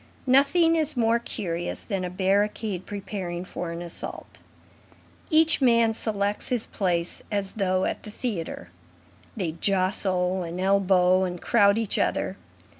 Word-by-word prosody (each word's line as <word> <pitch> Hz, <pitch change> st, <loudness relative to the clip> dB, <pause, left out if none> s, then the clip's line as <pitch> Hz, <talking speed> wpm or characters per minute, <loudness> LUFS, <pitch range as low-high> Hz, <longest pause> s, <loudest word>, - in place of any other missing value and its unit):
Nothing 285 Hz, +6 st, +4 dB
is 310 Hz, -3 st, 0 dB
more 230 Hz, 0 st, +3 dB
curious 175 Hz, -7 st, -4 dB
than 195 Hz, -4 st, -3 dB
a 180 Hz, -, -3 dB
barricade 195 Hz, +1 st, -1 dB
preparing 190 Hz, -3 st, -5 dB
for 175 Hz, -1 st, -5 dB
an 170 Hz, +1 st, -6 dB
assault. 170 Hz, -, -7 dB, 0.9 s
Each 320 Hz, -1 st, +5 dB
man 230 Hz, -3 st, +4 dB
selects 205 Hz, -2 st, -2 dB
his 245 Hz, -3 st, 0 dB
place 175 Hz, -4 st, -2 dB
as 200 Hz, -2 st, -2 dB
though 185 Hz, -3 st, 0 dB
at -, -, -3 dB
the -, -, -10 dB
theatre. 200 Hz, -, -5 dB, 0.7 s
They 180 Hz, -6 st, -1 dB
jostle, 185 Hz, +1 st, 0 dB
and 170 Hz, +1 st, -5 dB
elbow 190 Hz, -1 st, +3 dB
and 180 Hz, -1 st, -3 dB
crowd 200 Hz, 0 st, +3 dB
each 225 Hz, -3 st, 0 dB
other. -, -, 0 dB
195 Hz, 135 wpm, -25 LUFS, 180-225 Hz, 0.9 s, Each